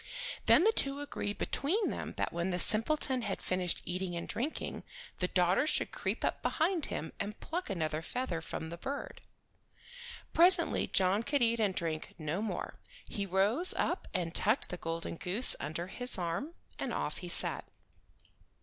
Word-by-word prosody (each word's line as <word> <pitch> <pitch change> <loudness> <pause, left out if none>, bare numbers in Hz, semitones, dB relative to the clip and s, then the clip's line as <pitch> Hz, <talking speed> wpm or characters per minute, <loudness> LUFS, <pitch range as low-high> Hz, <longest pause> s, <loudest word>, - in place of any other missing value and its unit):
Then - - +7
the 440 - +5
two 275 -5 +1
agreed 205 -8 -4
between 390 +10 0
them - - -5
that - - -1
when 170 +2 -1
the 180 - -1
simpleton 255 - +3
had 205 -4 -3
finished 180 -1 -1
eating 180 0 -3
and 170 - -4
drinking, 250 +9 -3 0.4
the 180 - +1
daughter 180 - +2
should - - +1
creep - - -2
up - - -1
behind 335 0 0
him 160 - -5
and 210 +1 -4
pluck 350 -1 -4
another 160 -4 -1
feather 180 -3 -3
from 160 0 -5
the 170 - -7
bird. 280 +7 -5 1.1
Presently 345 0 +7
John 190 +2 +2
could 280 +2 +1
eat 230 0 +2
and 200 -4 +1
drink 160 -2 -3
no 155 +4 -2
more. 220 - -3 0.3
He 200 -1 -3
rose 205 - +2
up - - -1
and 170 -2 -2
tucked 215 +8 +2
the 180 - -4
golden 165 0 -4
goose 200 +10 0
under 155 +4 -3
his 245 +6 +1
arm, 180 - -3 0.2
and - - -2
off - - -2
he - - -7
set. - - 0
200 Hz, 170 wpm, -32 LUFS, 175-275 Hz, 1.1 s, Then